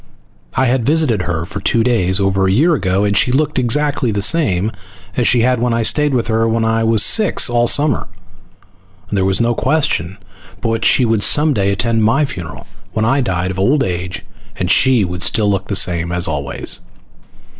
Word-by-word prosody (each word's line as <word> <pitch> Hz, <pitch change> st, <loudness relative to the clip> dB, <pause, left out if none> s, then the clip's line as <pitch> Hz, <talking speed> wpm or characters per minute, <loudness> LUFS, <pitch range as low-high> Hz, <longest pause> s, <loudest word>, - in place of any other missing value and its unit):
I 130 Hz, -, +2 dB
had 125 Hz, -1 st, 0 dB
visited 145 Hz, -7 st, +1 dB
her 85 Hz, -2 st, -3 dB
for 100 Hz, -, -7 dB
two 115 Hz, +3 st, +1 dB
days 100 Hz, -6 st, +1 dB
over 95 Hz, -1 st, +1 dB
a -, -, +1 dB
year 155 Hz, -, +3 dB
ago, 95 Hz, -, 0 dB
and 100 Hz, 0 st, 0 dB
she 110 Hz, -, +2 dB
had 125 Hz, -, 0 dB
looked 150 Hz, -1 st, 0 dB
exactly 140 Hz, +1 st, 0 dB
the 100 Hz, -2 st, -2 dB
same 110 Hz, -, +1 dB, 0.4 s
as 120 Hz, -, +1 dB
she 120 Hz, -, +3 dB
had 125 Hz, 0 st, +1 dB
when 120 Hz, 0 st, 0 dB
I 115 Hz, -, 0 dB
stayed 150 Hz, +3 st, +1 dB
with 120 Hz, -, 0 dB
her 115 Hz, 0 st, 0 dB
when 115 Hz, 0 st, 0 dB
I 115 Hz, 0 st, 0 dB
was 110 Hz, -2 st, +3 dB
six 210 Hz, -, +2 dB
all 120 Hz, 0 st, +2 dB
summer, 145 Hz, -5 st, +1 dB, 1.0 s
and -, -, -3 dB
there 95 Hz, -1 st, +1 dB
was 95 Hz, 0 st, 0 dB
no 120 Hz, 0 st, +1 dB
question 115 Hz, -, -1 dB, 0.4 s
but 115 Hz, -, -3 dB
what 115 Hz, 0 st, -2 dB
she 130 Hz, -, +3 dB
would 110 Hz, -2 st, 0 dB
some 150 Hz, +7 st, +2 dB
day 100 Hz, -3 st, 0 dB
attend 115 Hz, +2 st, 0 dB
my 135 Hz, +7 st, +2 dB
funeral 90 Hz, -, -8 dB, 0.3 s
when 110 Hz, -, -1 dB
I 135 Hz, +4 st, +1 dB
died 95 Hz, -6 st, -2 dB
of 95 Hz, -, -6 dB
old 135 Hz, +9 st, +2 dB
age, 90 Hz, 0 st, -5 dB, 0.3 s
and 90 Hz, 0 st, -2 dB
she 130 Hz, -6 st, +3 dB
would 90 Hz, 0 st, -6 dB
still 100 Hz, +2 st, +2 dB
look 100 Hz, -1 st, -3 dB
the 100 Hz, -, -3 dB
same 85 Hz, -2 st, +1 dB
as 90 Hz, 0 st, 0 dB
always. 70 Hz, -2 st, -2 dB
115 Hz, 210 wpm, -16 LUFS, 95-125 Hz, 1.0 s, year